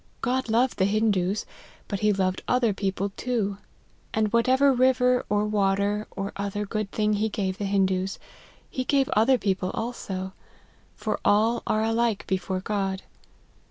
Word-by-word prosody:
God 255 Hz, 0 st, 0 dB
loved 235 Hz, +2 st, +2 dB
the 190 Hz, -, +4 dB
Hindoos, 205 Hz, -2 st, +1 dB, 0.4 s
but 200 Hz, -, -3 dB
he 210 Hz, +1 st, +3 dB
loved 190 Hz, -2 st, 0 dB
other 245 Hz, -4 st, +2 dB
peo 195 Hz, 0 st, -1 dB
ple 195 Hz, +1 st, -3 dB
too; 205 Hz, -2 st, -2 dB, 0.6 s
and 215 Hz, 0 st, +1 dB
whatever 260 Hz, +4 st, +4 dB
river, 250 Hz, 0 st, +3 dB
or 205 Hz, 0 st, +2 dB
water, 205 Hz, 0 st, +1 dB
or 195 Hz, +1 st, -5 dB
other 200 Hz, +1 st, -3 dB
good 215 Hz, -1 st, -3 dB
thing 210 Hz, -1 st, +1 dB
he 210 Hz, +2 st, 0 dB
gave 195 Hz, -2 st, -2 dB
the 200 Hz, -, -1 dB
Hindoos, 190 Hz, -1 st, +1 dB, 0.5 s
he 255 Hz, -, -3 dB
gave 275 Hz, +1 st, +2 dB
other 245 Hz, +3 st, +4 dB
people 190 Hz, -4 st, -1 dB
also: 190 Hz, -5 st, -4 dB, 0.6 s
for -, -, -2 dB
all 220 Hz, +3 st, +3 dB
are 215 Hz, 0 st, +1 dB
alike 225 Hz, -1 st, 0 dB
before 190 Hz, 0 st, -2 dB
God. 195 Hz, -1 st, -2 dB
210 Hz, 155 wpm, -26 LUFS, 195-235 Hz, 0.6 s, the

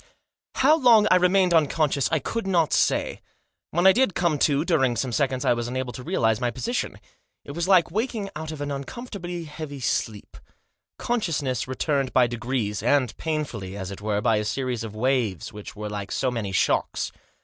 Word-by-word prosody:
How 305 Hz, +5 st, +4 dB
long 230 Hz, -6 st, +6 dB
I -, -, +7 dB
remained 180 Hz, 0 st, +3 dB
unconscious 150 Hz, -3 st, +2 dB
I 160 Hz, -, +3 dB
could 195 Hz, -, -3 dB
not 170 Hz, -5 st, +2 dB
say -, -, +1 dB, 0.5 s
When 175 Hz, +3 st, 0 dB
I 190 Hz, -, +9 dB
did 250 Hz, -4 st, +2 dB
come 170 Hz, -4 st, +1 dB
to, 145 Hz, +2 st, +2 dB
during 135 Hz, -9 st, +2 dB
some 125 Hz, +2 st, -2 dB
seconds 130 Hz, +1 st, 0 dB
I 130 Hz, -, +4 dB
was 120 Hz, 0 st, -3 dB
unable 125 Hz, 0 st, -3 dB
to -, -, -7 dB
realise 115 Hz, -, +1 dB
my 125 Hz, -1 st, 0 dB
position. 180 Hz, -, -3 dB, 0.5 s
It -, -, -7 dB
was 170 Hz, +4 st, -2 dB
like 185 Hz, -4 st, +4 dB
waking 220 Hz, -3 st, -2 dB
out 155 Hz, +1 st, -5 dB
of 155 Hz, -2 st, -7 dB
an 145 Hz, 0 st, -3 dB
uncomfortably 175 Hz, -, -6 dB
heavy 150 Hz, -2 st, -7 dB
sleep. 110 Hz, -4 st, -3 dB, 0.6 s
Consciousness 155 Hz, -, -1 dB
returned 135 Hz, 0 st, -1 dB
by 125 Hz, -1 st, +5 dB
degrees, 120 Hz, -3 st, -2 dB
and 125 Hz, 0 st, +2 dB
painfully; 125 Hz, -, -4 dB
as 95 Hz, -1 st, -5 dB
it 100 Hz, -, -8 dB
were, 105 Hz, -1 st, -1 dB
by 115 Hz, -1 st, +2 dB
a 105 Hz, -, 0 dB
series 125 Hz, +1 st, -2 dB
of 110 Hz, -2 st, -7 dB
waves, 115 Hz, -, -1 dB
which 105 Hz, -1 st, -9 dB
were 105 Hz, 0 st, -5 dB
like 100 Hz, -2 st, -5 dB
so 130 Hz, -, 0 dB
many 110 Hz, -5 st, -3 dB
shocks. 95 Hz, -, 0 dB
140 Hz, 185 wpm, -25 LUFS, 120-170 Hz, 0.6 s, I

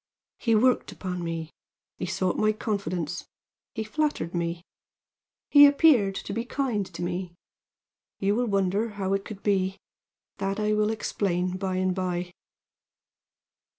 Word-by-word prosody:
He 230 Hz, -3 st, +2 dB
worked 250 Hz, +3 st, +3 dB
upon 180 Hz, -2 st, -4 dB
me. 165 Hz, -1 st, -4 dB, 0.5 s
He 180 Hz, -, -2 dB
sought 185 Hz, 0 st, 0 dB
my 215 Hz, 0 st, +2 dB
confidence. 185 Hz, -6 st, -3 dB, 0.5 s
He 220 Hz, -, -2 dB
flattered 220 Hz, -, -1 dB
me. 170 Hz, 0 st, -2 dB, 0.9 s
He 290 Hz, -1 st, +10 dB
appeared 280 Hz, -10 st, +4 dB
to 200 Hz, -, -5 dB
be 230 Hz, +2 st, -1 dB
kind 240 Hz, -6 st, -1 dB
to -, -, -5 dB
me. 175 Hz, 0 st, -3 dB, 0.8 s
You 200 Hz, +1 st, +1 dB
will 240 Hz, +3 st, +1 dB
wonder 200 Hz, +2 st, +1 dB
how 195 Hz, -1 st, 0 dB
it 195 Hz, 0 st, 0 dB
could 205 Hz, -2 st, -9 dB
be. 190 Hz, -2 st, +1 dB, 0.6 s
That 195 Hz, +2 st, -1 dB
I 210 Hz, 0 st, +1 dB
will 210 Hz, 0 st, +2 dB
explain 185 Hz, -4 st, -1 dB
by 185 Hz, 0 st, -2 dB
and 185 Hz, 0 st, +1 dB
by. 180 Hz, -1 st, -2 dB
195 Hz, 140 wpm, -27 LUFS, 180-215 Hz, 0.9 s, He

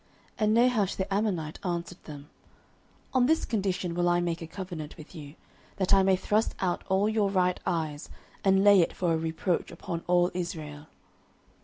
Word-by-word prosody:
09:011:002 -, -, -37 dB
And 215 Hz, -, +3 dB
Nahash 235 Hz, -5 st, +3 dB
the 190 Hz, +1 st, -3 dB
Ammonite 180 Hz, -7 st, -1 dB
answered 175 Hz, -1 st, -4 dB
them, 145 Hz, -2 st, -9 dB, 0.9 s
On 255 Hz, -2 st, +4 dB
this 320 Hz, +2 st, +2 dB
condition 190 Hz, -5 st, -1 dB
will 175 Hz, 0 st, +1 dB
I 175 Hz, 0 st, +3 dB
make 170 Hz, -1 st, -2 dB
a 165 Hz, -, -6 dB
covenant 170 Hz, -4 st, -7 dB
with 155 Hz, -, -12 dB
you, 150 Hz, -3 st, -10 dB, 0.4 s
that 190 Hz, -1 st, +2 dB
I 195 Hz, -, +6 dB
may 190 Hz, 0 st, +4 dB
thrust 210 Hz, +4 st, 0 dB
out 180 Hz, -2 st, -1 dB
all 190 Hz, +2 st, +2 dB
your 215 Hz, -2 st, +1 dB
right 180 Hz, -2 st, +1 dB
eyes, 155 Hz, -3 st, -2 dB, 0.3 s
and 195 Hz, 0 st, +4 dB
lay 200 Hz, -2 st, +7 dB
it 165 Hz, -, 0 dB
for 175 Hz, -2 st, 0 dB
a -, -, +1 dB
reproach 165 Hz, +2 st, -1 dB
upon 170 Hz, -1 st, -6 dB
all 175 Hz, 0 st, +3 dB
Israel. 155 Hz, -4 st, -5 dB
180 Hz, 180 wpm, -28 LUFS, 165-195 Hz, 0.9 s, lay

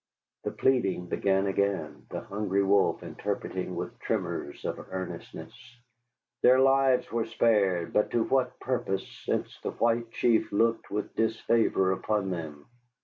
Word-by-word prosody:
The -, -, +1 dB
pleading 100 Hz, -9 st, +1 dB
began 95 Hz, 0 st, +1 dB
again, 100 Hz, 0 st, -1 dB
the -, -, -4 dB
Hungry 100 Hz, -1 st, -1 dB
Wolf 100 Hz, 0 st, +2 dB
interpreting -, -, -4 dB
with -, -, -5 dB
tremors 70 Hz, -, -3 dB
of -, -, -3 dB
earnestness. 95 Hz, -1 st, -6 dB, 0.9 s
Their 130 Hz, +1 st, +6 dB
lives 135 Hz, -1 st, +3 dB
were 115 Hz, -1 st, 0 dB
spared, 100 Hz, -7 st, +2 dB
but 105 Hz, -, +2 dB
to 115 Hz, -, +1 dB
what 130 Hz, 0 st, 0 dB
purpose, 95 Hz, -7 st, -2 dB, 0.2 s
since -, -, -2 dB
the -, -, -3 dB
White 115 Hz, 0 st, 0 dB
Chief 115 Hz, -1 st, +2 dB
looked 115 Hz, +3 st, +1 dB
with 105 Hz, +1 st, -4 dB
disfavor 110 Hz, -3 st, +2 dB
upon 95 Hz, +1 st, -1 dB
them? 80 Hz, -5 st, -6 dB
105 Hz, 135 wpm, -28 LUFS, 95-115 Hz, 0.9 s, Their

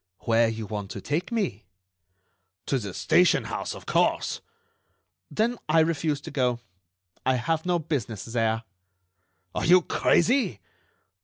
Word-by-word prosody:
"Where 115 Hz, 0 st, +3 dB
you 110 Hz, -1 st, -4 dB
want 105 Hz, -1 st, -5 dB
to -, -, -6 dB
take 160 Hz, +9 st, -2 dB
me." 195 Hz, -, -1 dB, 1.0 s
"To 135 Hz, -, 0 dB
the 100 Hz, -4 st, -5 dB
station 175 Hz, -, +3 dB
house, -, -, -4 dB
of -, -, -11 dB
course." -, -, +1 dB, 0.9 s
"Then 235 Hz, +2 st, 0 dB
I 160 Hz, +1 st, +5 dB
refuse 160 Hz, -2 st, 0 dB
to -, -, -8 dB
go. 125 Hz, -3 st, 0 dB, 0.6 s
I 130 Hz, -, +2 dB
have 160 Hz, +6 st, -1 dB
no 175 Hz, -1 st, +3 dB
business 140 Hz, -, -3 dB
there." 115 Hz, -1 st, 0 dB, 0.9 s
"Are -, -, -2 dB
you 180 Hz, +1 st, +7 dB
crazy?" 210 Hz, -, +2 dB
145 Hz, 135 wpm, -26 LUFS, 115-170 Hz, 1.0 s, you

